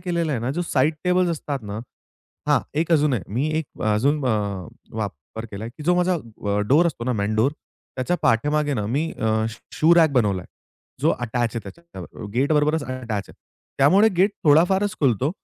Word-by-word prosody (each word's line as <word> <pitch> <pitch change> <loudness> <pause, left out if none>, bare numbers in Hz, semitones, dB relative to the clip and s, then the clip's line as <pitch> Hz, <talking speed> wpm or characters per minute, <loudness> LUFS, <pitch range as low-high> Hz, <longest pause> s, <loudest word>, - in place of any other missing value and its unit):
केलेलं 170 -3 -1
आहे 120 - -1
ना 120 - -2
जो - - +1
साइड 150 -1 +1
टेबल्स 180 -1 +2
असतात 145 -3 -3
ना 105 - -4 0.7
हां, - - +4
एक 165 +2 0
अजून 150 -3 +3
आहे 100 - -2
मी 135 +7 0
एक 160 - -7
अजून 135 +7 +1
अ, 100 -6 -1 0.3
वापर 105 +2 -6
केलाय, 105 +3 -6
की 130 +5 -11
जो 180 - +3
माझा 180 0 +2 0.5
डोअर 160 +5 +5
असतो 125 -8 -3
ना 125 - 0
मेन 105 0 -1
डोअर 130 +7 +3 0.4
त्याच्या 130 +8 0
पाठीमागे 145 +5 +2
ना 105 -3 -2
मी 145 +8 -1
अ, 110 - -2 0.2
शू 110 - -11 0.2
शू 165 +2 +6
रॅक 165 -3 +5
बनवलाय. 100 -8 +1 0.6
जो - - +4
अटॅच 120 0 -1
आहे - - -1
त्याच्या 170 0 -12 0.3
गेटबरोबरच 150 +3 +2
अटॅच 120 -6 -4
आहे. - - -13 0.5
त्यामुळे 190 +11 +6
गेट 195 +3 +4
थोडा-फारच 190 +7 +4
खुलतो 135 +1 +2
140 Hz, 180 wpm, -23 LUFS, 115-165 Hz, 0.7 s, शू